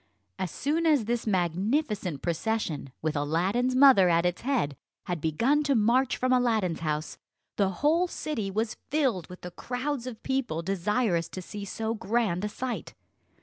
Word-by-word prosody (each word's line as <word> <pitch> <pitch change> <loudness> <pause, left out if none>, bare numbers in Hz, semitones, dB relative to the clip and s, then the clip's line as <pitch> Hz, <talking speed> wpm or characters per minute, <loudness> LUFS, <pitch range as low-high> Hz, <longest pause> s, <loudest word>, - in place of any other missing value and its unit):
As 185 - -1
soon 315 - 0
as 290 -8 +3
this 235 0 -2
magnificent 190 - 0
procession, 170 - -2
with 155 -1 0
Aladdin's 185 - +1
mother 255 -9 +7
at 170 0 +3
its 180 0 0
head, 240 - 0 0.3
had 175 -3 -3
begun 230 - +2
to 280 -2 +2
march 240 +4 +3
from 255 0 +1
Aladdin's 225 -9 +1
house, 155 -1 -3 0.4
the 200 -2 +2
whole 310 - +2
city 250 - -3
was 215 +3 -2
filled 265 - 0
with 180 - -11
the 180 - -7
crowds 255 +4 -3
of 230 -4 -8
people 260 -12 -1
desirous 195 -1 0
to 185 - -6
see 205 +2 -7
so 220 +3 -3
grand 215 -4 0
a 210 - -1
sight. 250 +3 -5
215 Hz, 160 wpm, -28 LUFS, 175-255 Hz, 0.4 s, mother